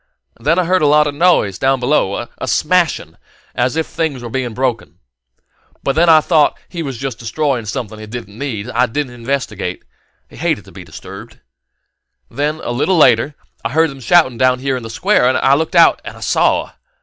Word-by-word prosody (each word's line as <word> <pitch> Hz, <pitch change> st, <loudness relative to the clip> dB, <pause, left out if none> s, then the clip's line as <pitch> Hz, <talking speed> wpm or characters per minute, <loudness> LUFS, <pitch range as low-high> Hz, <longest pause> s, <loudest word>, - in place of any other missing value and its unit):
Then 165 Hz, -, +1 dB
I 185 Hz, -, +3 dB
heard 185 Hz, +1 st, +2 dB
a 150 Hz, -, +3 dB
lot 150 Hz, +1 st, +5 dB
of 145 Hz, -, -2 dB
noise 145 Hz, -, +2 dB
down 135 Hz, 0 st, +2 dB
below 120 Hz, -4 st, 0 dB
a -, -, -4 dB
smashing 155 Hz, -, 0 dB, 0.4 s
as 125 Hz, +3 st, 0 dB
if 160 Hz, -1 st, 0 dB
things 145 Hz, -6 st, -3 dB
were 120 Hz, -, -7 dB
being 125 Hz, -3 st, -3 dB
broken. 125 Hz, -4 st, -2 dB, 0.9 s
But 140 Hz, +3 st, 0 dB
I 160 Hz, -1 st, +7 dB
thought 155 Hz, -2 st, +2 dB
he 170 Hz, -, -6 dB
was 135 Hz, -6 st, -5 dB
just 130 Hz, -2 st, -5 dB
destroying 125 Hz, +1 st, -2 dB
something 110 Hz, 0 st, -5 dB
he 110 Hz, -, -9 dB
didn't 110 Hz, -3 st, -8 dB
need, 120 Hz, -7 st, -4 dB
and 125 Hz, -, -8 dB
I 125 Hz, +1 st, +3 dB
didn't 130 Hz, +1 st, -3 dB
investigate: 115 Hz, -7 st, -4 dB, 0.4 s
he -, -, -16 dB
hated -, -, -1 dB
to -, -, -15 dB
be -, -, -10 dB
disturbed. -, -, -11 dB, 0.9 s
And -, -, -12 dB
then, 150 Hz, +2 st, -1 dB
a -, -, -3 dB
little 150 Hz, +9 st, +1 dB
later, 135 Hz, 0 st, +4 dB, 0.3 s
I 115 Hz, -, -1 dB
heard 160 Hz, 0 st, +3 dB
them 135 Hz, -, -11 dB
shouting 130 Hz, -3 st, +3 dB
out 130 Hz, 0 st, +3 dB
here 135 Hz, 0 st, -1 dB
in 125 Hz, -, -4 dB
the 115 Hz, -, -8 dB
Square, 155 Hz, -, +2 dB
and 130 Hz, -, +1 dB
I 135 Hz, -, +3 dB
looked 160 Hz, +5 st, 0 dB
out 170 Hz, -1 st, +5 dB
and -, -, -9 dB
saw. -, -, +1 dB
135 Hz, 200 wpm, -17 LUFS, 120-155 Hz, 0.9 s, I